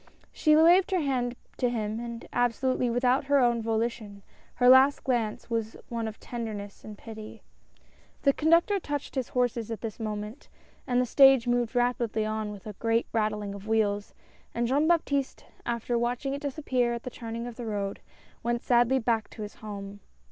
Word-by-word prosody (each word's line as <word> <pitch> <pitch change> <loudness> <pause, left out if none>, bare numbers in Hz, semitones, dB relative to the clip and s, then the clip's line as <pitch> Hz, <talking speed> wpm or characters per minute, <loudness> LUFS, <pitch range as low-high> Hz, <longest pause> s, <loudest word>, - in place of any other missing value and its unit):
She 305 -1 +3
waved 345 +5 +6
her 375 -3 +1
hand 250 -4 -1 0.2
to 250 - +1
him, 220 -2 -2
and 235 -1 -7
absolutely 245 +1 +1
without 250 +3 +2
her 285 +1 +3
own 240 -3 +3
volition 220 -2 -2 0.2
— - - -32
her 245 - +3
last 260 +2 +6
glance 235 -5 -1
was 225 -1 -3
one 230 -1 -3
of 220 - -7
tenderness 215 -4 -6
and 210 -1 -9
pity. 220 -1 -10 0.8
The 275 - +5
conductor 335 +7 +3
touched 290 -5 -4
his 260 -3 -2
horses 245 -3 0
at 225 - -5
this 225 -1 -6
moment, 215 +3 -5 0.4
and 245 0 +2
the 250 - +2
stage 270 0 +6
moved 240 0 0
rapidly 240 -3 +1
on 215 -1 -2
with 200 -2 -10
a 215 - -6
great 230 +3 0
rattling 210 -2 -1
of 200 +1 -9
wheels, 205 -2 0 0.4
and 235 - +1
Jean 285 +5 +2
Baptiste, 285 -5 0 0.2
after 235 0 -1
watching 245 +3 -1
it 280 - -4
disap 290 +1 -5
pear 245 -2 +1
at 235 - -7
the 250 - -6
turning 230 0 -6
of 240 -1 -7
the 240 -1 -6
road, 200 -2 -3 0.4
went 235 0 -1
sadly 245 +1 +3
back 225 -3 0
to 215 - -8
his 205 - -7
home.. 205 -1 -8
235 Hz, 185 wpm, -28 LUFS, 220-255 Hz, 0.8 s, waved